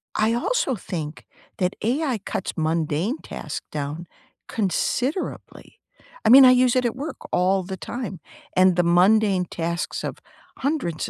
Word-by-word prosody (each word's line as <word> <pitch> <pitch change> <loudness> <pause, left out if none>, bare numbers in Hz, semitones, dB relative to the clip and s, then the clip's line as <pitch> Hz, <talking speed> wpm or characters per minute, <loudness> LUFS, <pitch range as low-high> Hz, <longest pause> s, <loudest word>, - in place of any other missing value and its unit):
I 220 +2 +2
also 485 - 0
think 160 -6 -6 0.3
that 180 -1 0
AI 255 0 0
cuts 190 - -4
mundane 160 - 0
tasks - - -6
down 150 +3 -4 0.4
considerably, 245 - -2 0.4
I - - +3
mean, 265 +2 +10
I 255 - +8
use 255 0 +4
it 250 - +2
at 235 - -1
work 285 +2 -5
all 185 +1 +2
the 190 +1 -6
time, 235 -7 -6 0.4
and 185 -1 +5
the 175 - +3
mundane 185 +2 +4
tasks 170 0 -3
of - - -5 0.4
hundreds 260 - -2
195 Hz, 140 wpm, -23 LUFS, 175-250 Hz, 0.4 s, mean